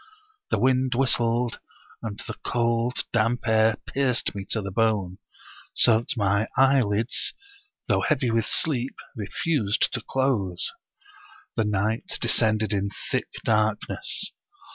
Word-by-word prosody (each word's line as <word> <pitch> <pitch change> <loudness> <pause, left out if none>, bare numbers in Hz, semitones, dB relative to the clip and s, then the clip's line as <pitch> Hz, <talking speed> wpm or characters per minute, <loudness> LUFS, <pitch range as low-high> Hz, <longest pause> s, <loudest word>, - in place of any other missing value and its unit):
The - - +1
wind 130 0 +2
whistled, 120 -2 +2 0.4
and 105 -2 -5
the - - -5
cold, 120 0 0
damp 115 +1 +1
air 110 0 +4
pierced 130 -4 0
me 100 -1 -6
to 110 - 0
the 100 -2 -5
bone, 100 -4 0 0.6
so 110 -2 +5
that 120 +2 -4
ray 100 +1 +1
eyelids, 125 -4 +2 0.5
though - - +2
heavy 125 -3 +1
with 115 -1 +1
sleep, 135 -4 +1 0.2
refused 110 +1 0
to - - -2
close. 110 -10 +1 0.8
The 110 - +1
night 105 +2 -1
descended 110 -2 +2
in 100 0 0 0.2
thick - - 0 0.2
darkness. 110 - 0
115 Hz, 120 wpm, -25 LUFS, 105-125 Hz, 0.8 s, so